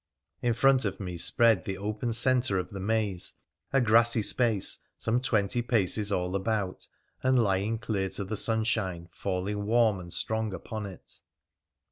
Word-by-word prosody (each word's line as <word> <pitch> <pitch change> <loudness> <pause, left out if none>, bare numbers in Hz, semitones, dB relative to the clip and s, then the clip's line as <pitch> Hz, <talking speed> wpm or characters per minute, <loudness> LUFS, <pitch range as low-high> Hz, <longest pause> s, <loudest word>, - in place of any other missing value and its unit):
In 120 -2 +1
front 135 +1 +4
of 100 -2 -2
me 90 -3 -5
spread 115 +5 +3
the 95 -1 -4
open 105 +4 -3
centre 125 -3 +2
of 90 - -3
the 100 - -6
maze, 105 -2 0 0.4
a 135 - +3
grassy 115 -1 +4
space 110 -2 +1 0.2
some 115 +2 0
twenty 110 -1 +1
paces 105 -3 +1
all 90 -1 -1
about, 100 -1 -2 0.3
and 130 0 +3
lying 105 0 +1
clear 100 -4 -2
to 100 - -3
the 100 +3 -4
sunshine 105 -6 0
falling 100 +3 -3
warm 110 -3 +3
and 85 -1 -10
strong 110 +4 0
upon 110 0 -6
it. 95 -3 -11
105 Hz, 155 wpm, -28 LUFS, 95-115 Hz, 0.4 s, front